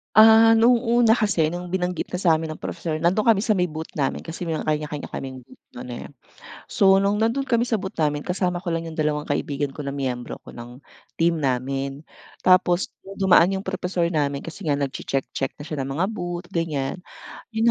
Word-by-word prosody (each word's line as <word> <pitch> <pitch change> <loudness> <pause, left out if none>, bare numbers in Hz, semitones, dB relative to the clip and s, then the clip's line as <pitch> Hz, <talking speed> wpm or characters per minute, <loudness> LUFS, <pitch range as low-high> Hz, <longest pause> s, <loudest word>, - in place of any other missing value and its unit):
Ah, 225 +1 +8
noong 240 +1 +4
una 235 -1 +4
kasi 205 -9 +2
nung 175 +2 -5
binanggit 180 -2 -2
na 180 - -2
sa'min 160 -3 +2
ng 155 - -8
professor 155 -2 -4
nandoon 190 +7 +3
kami 200 - +2
sa 215 +1 +1
may 180 -3 0
booth 160 +1 -6
namin 140 -3 -1
kasi 165 +2 -7
may 165 -2 -2
kanya-kanya 150 -1 -2
kaming 130 -1 -6
booth 255 - -19
nun, 255 0 -9
eh. - - -7 0.6
So, 195 -2 +4
nung 200 +1 +2
nandoon 230 +6 0
kami 235 -2 +2
sa 230 -3 0
booth 190 0 -6
namin 150 -2 -1
kasama 180 -1 0
ko 185 - -12
lang 165 -1 -1
yung 160 - -8
dalawang 150 -1 0
kaibigan 145 -1 -2
ko 145 0 -7
na 140 - -3
miyembro 125 -3 -3
ko - - -11
ng 120 +3 -11 0.3
team 165 0 +2
namin. 135 +1 -2 0.4
Tapos 185 0 +3 0.2
dumaan 190 -1 +4
yung 190 - -4
professor 185 -2 -2
namin 140 -3 -1
kasi 165 +2 -8
nga 145 - +3
nagche-check-check 135 -1 -3
na 145 - -10
siya 155 -1 -5
ng 135 0 -3
mga 170 +5 +1
booth 175 -3 -5
ganiyan. 155 -4 -2 0.6
Yun 220 - +1
170 Hz, 195 wpm, -23 LUFS, 145-195 Hz, 0.6 s, Ah